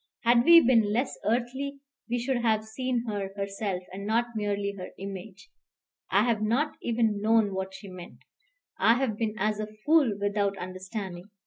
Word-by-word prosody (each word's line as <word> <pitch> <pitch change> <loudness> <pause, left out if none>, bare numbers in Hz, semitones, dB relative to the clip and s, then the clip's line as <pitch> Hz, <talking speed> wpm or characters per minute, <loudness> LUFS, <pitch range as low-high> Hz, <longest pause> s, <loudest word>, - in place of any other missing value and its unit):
Had 235 +1 +4
we 335 0 +10
been 225 -4 +4
less 245 +5 0
earthly, 255 +5 -1 0.3
we 245 - 0
should 250 +2 0
have 220 -2 +1
seen 245 +2 -2
her 205 -3 -3
herself, 195 -1 -3
and 195 +1 -6
not 235 +2 +1
merely 205 -1 -1
her 185 -2 -7
image. 195 0 -8 0.6
I 200 +2 +4
have 230 -3 +1
not 245 +8 +1
even 225 -3 0
known 220 -2 +3
what 190 0 -4
she 200 - -10
meant. 180 -2 -11 0.6
I 230 - +5
have 250 -4 0
been 215 0 -2
as 210 +1 0
a 215 - -2 0.2
fool 295 -10 +4
without 200 -1 0
understanding. 185 0 -6
215 Hz, 165 wpm, -28 LUFS, 200-240 Hz, 0.6 s, we